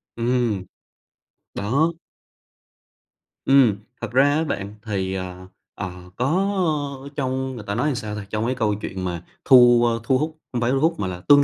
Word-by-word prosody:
Ừm. 120 Hz, -4 st, 0 dB, 0.9 s
Đó. 140 Hz, +11 st, +1 dB, 1.5 s
Ừm, 135 Hz, -6 st, +6 dB, 0.3 s
thật 115 Hz, -2 st, -4 dB
ra 130 Hz, +2 st, +5 dB
á 160 Hz, -, +1 dB
bạn 100 Hz, -8 st, -4 dB
thì, 95 Hz, -3 st, -2 dB
à, 95 Hz, 0 st, -6 dB, 0.3 s
à, 95 Hz, -, -4 dB, 0.2 s
có 150 Hz, -, 0 dB
trong 130 Hz, -1 st, -2 dB
người 110 Hz, -, -7 dB
ta 100 Hz, -, -2 dB
nói 145 Hz, +1 st, +1 dB
sao 105 Hz, -3 st, -4 dB
ta, 105 Hz, -2 st, -6 dB
trong 110 Hz, +1 st, -1 dB
cái 130 Hz, +2 st, 0 dB
câu 110 Hz, -4 st, +1 dB
chuyện 95 Hz, -1 st, -5 dB
mà 85 Hz, -2 st, -3 dB, 0.2 s
thu, 120 Hz, -2 st, +7 dB
a, 115 Hz, -, +2 dB
thu 130 Hz, +3 st, +2 dB
hút 155 Hz, +2 st, -3 dB
không 120 Hz, -1 st, -2 dB
phải 120 Hz, +2 st, +2 dB
thu 135 Hz, -, +2 dB
hút 165 Hz, +2 st, +1 dB
mà 95 Hz, -, -1 dB
là 90 Hz, -1 st, -6 dB
tương 145 Hz, 0 st, +8 dB
120 Hz, 175 wpm, -23 LUFS, 105-140 Hz, 1.5 s, tương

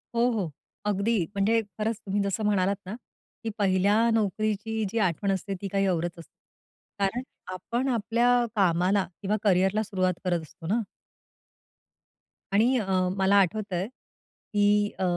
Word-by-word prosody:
हो, 240 Hz, +2 st, +3 dB
हो, 195 Hz, -8 st, -2 dB, 0.3 s
अगदी. 205 Hz, -1 st, +1 dB
म्हणजे 220 Hz, +3 st, +3 dB, 0.2 s
खरंच 215 Hz, 0 st, -1 dB
तुम्ही 200 Hz, +1 st, 0 dB
जसं 200 Hz, +2 st, -2 dB
म्हणालात 200 Hz, -2 st, +2 dB
ना, 195 Hz, +4 st, -5 dB, 0.5 s
की 225 Hz, -, -2 dB
पहिल्या 200 Hz, +1 st, +3 dB
नोकरीची 215 Hz, +1 st, 0 dB
जी 230 Hz, -, -3 dB
आठवण 195 Hz, 0 st, +1 dB
असते 195 Hz, +1 st, -2 dB
ती 200 Hz, -, -3 dB
काही 195 Hz, 0 st, +2 dB
औरच 175 Hz, -2 st, 0 dB
असते. 165 Hz, -, -13 dB, 0.7 s
कारण 200 Hz, +5 st, 0 dB, 0.3 s
आपण 235 Hz, +8 st, -2 dB
आपल्या 240 Hz, +1 st, +2 dB
कामाला 185 Hz, 0 st, +3 dB, 0.2 s
किंवा 205 Hz, +1 st, 0 dB
करियरला 195 Hz, +2 st, +3 dB
सुरुवात 185 Hz, -3 st, 0 dB
करत 175 Hz, -2 st, +1 dB
असतो 160 Hz, +2 st, -11 dB
ना. 220 Hz, +6 st, +1 dB, 1.7 s
आणि 235 Hz, +6 st, +4 dB
अ, 215 Hz, -, -2 dB, 0.3 s
मला 190 Hz, +1 st, +3 dB
आठवतंय 195 Hz, -1 st, +1 dB
की 205 Hz, -4 st, -1 dB
अ, -, -, 0 dB
200 Hz, 140 wpm, -27 LUFS, 190-220 Hz, 1.7 s, आणि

